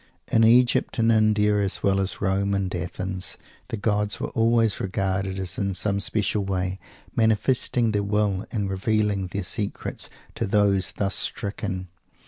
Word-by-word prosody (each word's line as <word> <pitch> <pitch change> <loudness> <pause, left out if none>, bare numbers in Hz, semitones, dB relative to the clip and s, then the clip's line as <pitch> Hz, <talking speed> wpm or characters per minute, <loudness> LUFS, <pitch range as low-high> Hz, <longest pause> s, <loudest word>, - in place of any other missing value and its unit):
In 115 - +4
Egypt 120 +2 +4
and 115 0 +3
India, 105 -1 +3
as 100 0 -1
well 100 0 +3
as 95 0 0
in - - -10
Rome 100 +1 +1
and 95 -2 -1
Athens, 95 +1 -3 0.3
the 115 - -4
gods 105 0 0
were - - -3
always 115 -2 +2
regarded 95 0 -1
as 95 -1 -2
in 100 -1 -1
some 100 +1 0
especial 100 +1 0
way 95 -1 -2 0.4
manifesting 115 +1 +2
their 105 -1 +1
will, 100 -1 0
and 105 -4 -2
revealing 100 0 0
their 100 +2 -4
secrets, 100 +4 -3 0.2
to 115 - -2
those 100 -1 +2
thus 100 -1 -1
stricken. 95 -2 -4
100 Hz, 155 wpm, -25 LUFS, 95-110 Hz, 0.4 s, In